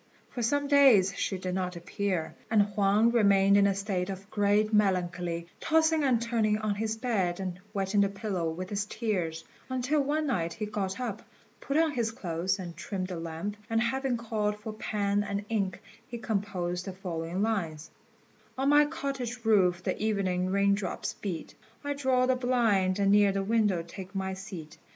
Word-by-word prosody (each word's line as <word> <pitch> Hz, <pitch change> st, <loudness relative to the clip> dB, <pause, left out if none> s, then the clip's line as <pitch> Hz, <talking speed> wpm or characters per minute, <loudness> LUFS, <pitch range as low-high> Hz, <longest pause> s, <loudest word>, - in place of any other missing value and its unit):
For 245 Hz, -, -4 dB
some 285 Hz, +5 st, +1 dB
days 260 Hz, -10 st, +6 dB
she 190 Hz, -, -1 dB
did 185 Hz, 0 st, -4 dB
not 180 Hz, -1 st, -2 dB
appear; 180 Hz, -1 st, -2 dB, 0.2 s
and 215 Hz, -2 st, +5 dB
Huang 205 Hz, +2 st, +3 dB
remained 200 Hz, -4 st, +5 dB
in 200 Hz, 0 st, +5 dB
a 195 Hz, -, +1 dB
state 195 Hz, -2 st, -2 dB
of 195 Hz, +1 st, -7 dB
great 205 Hz, +1 st, +2 dB
melancholy, 175 Hz, -4 st, +1 dB
tossing 320 Hz, -1 st, +3 dB
and 255 Hz, -4 st, +3 dB
turning 225 Hz, -2 st, +1 dB
on 215 Hz, -1 st, -1 dB
his 220 Hz, +2 st, -2 dB
bed 200 Hz, -8 st, 0 dB
and 185 Hz, -2 st, -4 dB
wetting 200 Hz, 0 st, +1 dB
the 200 Hz, -, +3 dB
pillow 195 Hz, -4 st, -2 dB
with 180 Hz, +4 st, -6 dB
his 205 Hz, 0 st, -1 dB
tears, 185 Hz, -8 st, -2 dB, 0.3 s
until 260 Hz, +4 st, +1 dB
one 300 Hz, +3 st, 0 dB
night 170 Hz, -, -1 dB
he 215 Hz, -, -4 dB
got 200 Hz, -1 st, -3 dB
up, 230 Hz, -5 st, -3 dB, 0.4 s
put 280 Hz, -, -1 dB
on 320 Hz, -1 st, +3 dB
his 235 Hz, -5 st, 0 dB
clothes, 185 Hz, -3 st, -2 dB
and 175 Hz, -3 st, -7 dB
trimmed 185 Hz, +2 st, -4 dB
the 180 Hz, -, -4 dB
lamp; 165 Hz, +5 st, -5 dB
and 225 Hz, 0 st, +2 dB
having 260 Hz, +2 st, 0 dB
called 215 Hz, -2 st, -2 dB
for 215 Hz, +1 st, -6 dB
pen 205 Hz, -1 st, 0 dB
and 200 Hz, 0 st, -3 dB
ink, 195 Hz, -5 st, -1 dB, 0.3 s
he 240 Hz, -, -6 dB
composed 195 Hz, -5 st, -2 dB
the 190 Hz, -, -5 dB
following 180 Hz, 0 st, -3 dB
lines: 170 Hz, -9 st, -2 dB, 0.7 s
"On 270 Hz, +1 st, +1 dB
my 295 Hz, +1 st, +6 dB
cottage 270 Hz, -6 st, -4 dB
roof 185 Hz, -5 st, +3 dB
the -, -, -2 dB
evening 190 Hz, -4 st, 0 dB
raindrops 200 Hz, 0 st, 0 dB
beat; 175 Hz, -6 st, -5 dB, 0.3 s
I 285 Hz, 0 st, -1 dB
draw 260 Hz, -3 st, +2 dB
the 260 Hz, 0 st, +2 dB
blind 225 Hz, -7 st, +2 dB
and 200 Hz, -1 st, +3 dB
near 205 Hz, -1 st, +5 dB
the 195 Hz, 0 st, -1 dB
window 205 Hz, -5 st, +2 dB
take 185 Hz, +3 st, -10 dB
my 190 Hz, 0 st, -2 dB
seat. 170 Hz, -5 st, -9 dB
200 Hz, 180 wpm, -29 LUFS, 185-230 Hz, 0.7 s, days